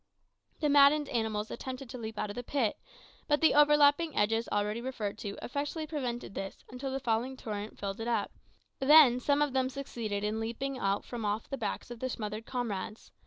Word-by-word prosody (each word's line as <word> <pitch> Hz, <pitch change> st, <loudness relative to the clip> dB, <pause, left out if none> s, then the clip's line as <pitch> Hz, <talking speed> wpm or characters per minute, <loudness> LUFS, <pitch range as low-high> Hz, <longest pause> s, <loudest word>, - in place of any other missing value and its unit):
The 300 Hz, -, +3 dB
maddened 285 Hz, 0 st, +5 dB
animals 220 Hz, -3 st, -1 dB
attempted 260 Hz, 0 st, -6 dB
to 255 Hz, -, -7 dB
leap 220 Hz, -1 st, -6 dB
out 210 Hz, -, -2 dB
of -, -, -9 dB
the 245 Hz, -, -3 dB
pit, 245 Hz, -3 st, 0 dB, 0.5 s
but 295 Hz, -1 st, +3 dB
the 320 Hz, -, +5 dB
overlapping 295 Hz, +2 st, +5 dB
edges 225 Hz, +2 st, +1 dB
already 210 Hz, +2 st, 0 dB
referred 215 Hz, -5 st, -4 dB
to 200 Hz, -2 st, -5 dB
effectually 290 Hz, +4 st, -3 dB
prevented 250 Hz, -9 st, -4 dB
this 195 Hz, -1 st, -6 dB
until 260 Hz, +2 st, -4 dB
the 270 Hz, -, -2 dB
falling 245 Hz, +1 st, -1 dB
torrent 210 Hz, -2 st, -5 dB
filled 195 Hz, 0 st, -4 dB
it 225 Hz, -, -3 dB
up; 240 Hz, -, 0 dB, 0.5 s
then 270 Hz, -3 st, +7 dB
some 285 Hz, +3 st, +2 dB
of 290 Hz, -3 st, -2 dB
them 260 Hz, -1 st, +1 dB
succeeded 230 Hz, -7 st, -4 dB
in 210 Hz, +1 st, -1 dB
leaping 255 Hz, +4 st, -3 dB
out 195 Hz, -1 st, 0 dB
from 240 Hz, -2 st, -6 dB
off 210 Hz, +1 st, -1 dB
the -, -, 0 dB
backs 240 Hz, 0 st, -4 dB
of 240 Hz, -, -7 dB
their 255 Hz, -, -2 dB
smothered 215 Hz, -1 st, -5 dB
comrades. 225 Hz, -4 st, -4 dB
245 Hz, 195 wpm, -31 LUFS, 215-275 Hz, 0.5 s, then